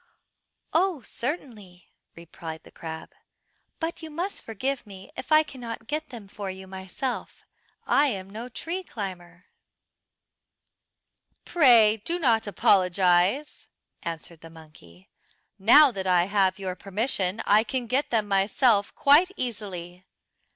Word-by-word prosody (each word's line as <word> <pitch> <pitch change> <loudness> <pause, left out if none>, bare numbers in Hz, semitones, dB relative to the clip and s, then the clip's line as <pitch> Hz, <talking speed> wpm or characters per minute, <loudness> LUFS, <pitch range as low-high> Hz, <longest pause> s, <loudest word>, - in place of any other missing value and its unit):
"Oh, 335 -5 +1
certainly," 220 - -7 0.2
replied 165 -1 -9
the - - -16
crab, 160 -1 -8 0.7
"but 335 0 -4
you 320 - -8
must 350 +6 -4
forgive 250 +3 -4
me 195 -1 -12
if - - -8
I 310 0 +7
cannot 235 -6 -8
get 305 +5 -4
them 230 -5 -10
for 200 0 -6
you 190 0 -8
myself. 190 +7 -6 0.4
I 290 +1 +4
am 195 -7 -3
no 220 +5 -8
tree 335 +9 -4
climber." 185 - -8 2.0
"Pray 235 -9 +5
do 330 +12 -2
not 230 -9 +2
apologise," 185 - +2 0.3
answered 165 0 -7
the 165 - -11
monkey. 155 - -16 0.5
"Now 270 +8 +7
that 190 -4 -4
I 180 -1 +4
have 195 -1 +1
your 190 -2 -4
permission 195 0 -1
I 210 +2 +5
can 255 +1 -3
get 260 +5 0
them 220 -3 0
myself 200 +2 +2
quite 300 +6 +5
easily." 185 -7 -5
210 Hz, 125 wpm, -26 LUFS, 185-265 Hz, 2.0 s, I